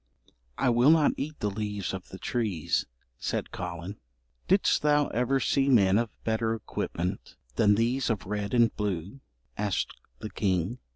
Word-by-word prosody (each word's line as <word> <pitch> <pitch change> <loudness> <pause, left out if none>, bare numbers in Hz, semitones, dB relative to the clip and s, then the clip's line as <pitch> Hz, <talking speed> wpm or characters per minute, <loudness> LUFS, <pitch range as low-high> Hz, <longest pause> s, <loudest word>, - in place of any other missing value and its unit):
"I 125 - +2
will 120 +4 +5
not 155 -2 +5
eat 150 +2 -5
the 105 - 0
leaves 105 -2 -3
of 95 -1 -7
the 95 - -8
trees," 105 -8 -1 0.3
said - - -3
Collen. 85 +5 -6 0.5
"Didst - - +3
thou 150 -1 +3
ever 125 +3 +1
see 135 +1 +2
men 100 -5 +5
of 115 -1 -1
better 110 0 0
equipment 90 -5 -4 0.2
than 105 -2 +4
these 120 +4 +1
of 110 -4 -1
red 105 +2 -2
and 120 -2 +4
blue?" 100 +2 -3 0.4
asked 105 -2 -1 0.2
the 105 - -7
king. 95 +3 -1
110 Hz, 155 wpm, -28 LUFS, 95-125 Hz, 0.5 s, will